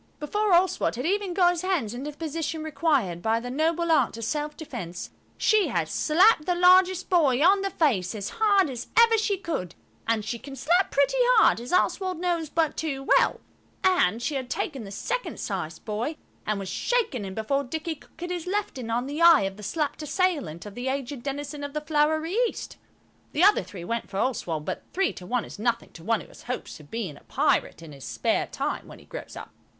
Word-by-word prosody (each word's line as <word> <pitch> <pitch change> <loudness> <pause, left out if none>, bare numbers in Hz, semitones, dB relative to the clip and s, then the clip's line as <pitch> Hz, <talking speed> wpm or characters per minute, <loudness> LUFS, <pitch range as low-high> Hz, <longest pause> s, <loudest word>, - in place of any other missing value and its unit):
Before 415 +7 0
Oswald 360 -5 +3
had 250 +4 -4
even 390 0 0
got 355 -2 +5
his 350 -2 -3
hands 360 - -1
into 265 +5 -5
the 295 - -11
position 320 0 -3
required 285 - 0
by 225 +2 +1
the 245 +1 -6
noble 325 +4 +1
art 265 -7 +3
of 230 - -6
self 295 +6 -2
defence, 195 - -7 0.3
she 430 -2 +3
had - - -1
slapped 335 +1 +4
the 360 - +2
largest 365 +1 +5
boy 295 -9 +3
on 390 +2 +5
the 390 - -1
face 230 - +1
as 205 -1 -4
hard 400 -4 +5
as 245 -1 -6
ever 460 0 +7
she 410 -2 0
could–and 225 - -4
she 235 +1 -3
can 275 +2 -9
slap 350 +8 +2
pretty 280 - +2 0.2
hard, 435 - +5
as 245 - -7
Oswald 370 0 +1
knows 340 -3 -1
but 320 -1 +1
too 275 -4 -3
well–and 240 - 0
she 305 - -1
had 260 -3 -3
taken 265 -4 -3
the - - -8
second - - -3
sized 170 -5 -4
boy 230 +8 -3 0.3
and 215 -1 0
was 195 -1 -5
shaking 420 - 0
him 190 -1 -6
before 275 +6 0
Dicky 320 +5 -4
could 300 - -19
get 350 +2 -5
his 355 -1 -4
left 400 -7 -2
in 235 -2 -6
on 240 +2 0
the 290 +4 -4
eye 335 -3 +8
of 195 0 -3
the 210 - -12
slapped 300 +8 -2
assailant 300 - -1
of 205 - -8
the 245 +3 -5
aged 270 -1 -3
denizen 285 +2 -5
of 285 0 -5
the 300 - -2
Flowery 315 +2 +1
East. - - -7 0.6
The 315 - +2
other 410 +2 +6
three 180 -4 -9
went 230 +5 -3
for 195 - -5
Oswald, 180 -10 -1
but - - -3
three 385 0 +1
to 180 - -10
one 245 +1 0
is - - -11
nothing 235 +1 -1
to 165 - -13
one 225 +3 +1
who - - -13
has - - -15
hopes 250 -8 -6
of 145 -1 -15
being 200 -11 -4
a - - -18
pirate 165 - 0
in 160 - -10
his 140 -2 -12
spare - - 0
time - - -3
when - - -11
he - - -17
grows - - -8
up. - - -9
290 Hz, 215 wpm, -26 LUFS, 230-350 Hz, 0.6 s, eye